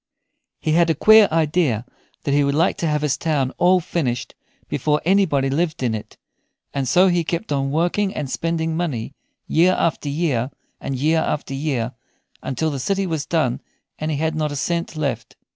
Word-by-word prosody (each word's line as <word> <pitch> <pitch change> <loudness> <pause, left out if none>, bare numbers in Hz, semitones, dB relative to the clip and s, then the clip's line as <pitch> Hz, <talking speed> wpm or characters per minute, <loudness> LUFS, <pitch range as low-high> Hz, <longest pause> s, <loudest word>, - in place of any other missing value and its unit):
He 155 - -1
had 170 +1 +4
a 160 - +2
queer 215 +6 +7
idea 155 -7 +1 0.4
that 140 - 0
he 145 0 +4
would 140 0 +1
like 165 +4 +2
to 165 - -1
have 150 -1 0
his 150 -3 +1
town 145 -5 0
all 180 +1 +5
finished 140 -8 -2 0.3
before 150 0 0
anybody 175 -8 +3
lived 155 +1 -1
in 120 -3 +1
it, 110 - -7 0.6
and 135 -2 -1
so 180 +9 +5
he 175 -2 +2
kept 170 +4 -3
on 135 -1 0
working 175 +7 +1
and 145 - -3
spending 165 +3 -2
money 140 -8 -3 0.3
year 175 +3 +3
after 160 -3 0
year 140 -5 0 0.3
and 135 - -4
year 155 +5 +2
after 145 -3 -2
year 135 -4 -2 0.5
until 155 +4 -2
the 140 - -4
city 195 +8 0
was 160 -5 -3
done 155 -8 0 0.4
and 155 - -2
he 150 - -1
had 160 +2 0
not 155 -1 -1
a - - -4
cent 170 +3 -2
left. 135 -7 -3
155 Hz, 185 wpm, -21 LUFS, 135-170 Hz, 0.6 s, queer